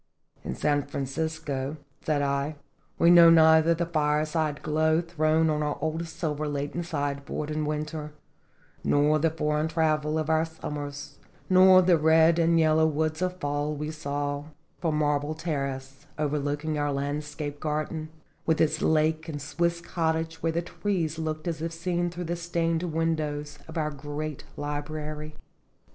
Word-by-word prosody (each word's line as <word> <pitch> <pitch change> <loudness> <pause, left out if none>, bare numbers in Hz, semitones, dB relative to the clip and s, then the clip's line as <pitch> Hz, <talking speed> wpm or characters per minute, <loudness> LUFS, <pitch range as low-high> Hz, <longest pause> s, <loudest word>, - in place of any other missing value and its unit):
"In - - -4
San 145 -1 +1
Francisco," 140 0 -3 0.3
said 145 -2 +1
I, 140 +2 -1 0.4
"we 170 - +5
know 170 -1 +9
neither 160 0 +6
the 170 +1 -1
fire 150 -2 +1
side 155 -2 -2
glow 155 +1 +2
thrown 160 -1 +1
on 150 -1 +1
our 150 -1 -1
old 160 +2 -2
silver 155 -2 -3
laden 145 +3 -3
side 145 -4 -3
board 150 +2 -4
in 155 0 -1
winter, 150 0 -3 0.7
nor 150 +1 +3
the 165 +2 +3
for 150 -1 -1
eign 155 +1 0
travel 155 -1 +1
of 155 -1 -1
our 160 0 +3
summers, 145 -3 -6 0.3
nor 185 0 +8
the 175 -2 +4
red 160 +2 +5
and 165 0 +4
yellow 160 0 +4
woods 155 +1 -1
of 180 0 -1
fall 145 0 -1
we 150 +1 -4
saw 145 -1 -3 0.3
from 165 -3 0
the - - +1
marble 145 +1 0
terrace 140 -3 -4
overlooking 150 +1 -1
our 145 0 0
landscape 145 +1 -3
garden, 155 +1 -3 0.3
with 160 -1 +1
its 155 0 +2
lake 160 +1 +2
and 145 -2 -4
Swiss 170 +3 -1
cottage 160 -1 -2
where 165 - +1
the 170 +1 -1
trees 170 -4 -2
looked 155 0 -3
as 160 -2 -2
if 165 0 -2
seen 175 +1 -1
through 175 +1 -6
the 170 0 -2
stained 170 -1 -1
windows 155 -3 -2
of 160 - -7
our 150 -1 0
great 145 +1 -5
library." 150 +1 -5
155 Hz, 160 wpm, -27 LUFS, 150-160 Hz, 0.7 s, know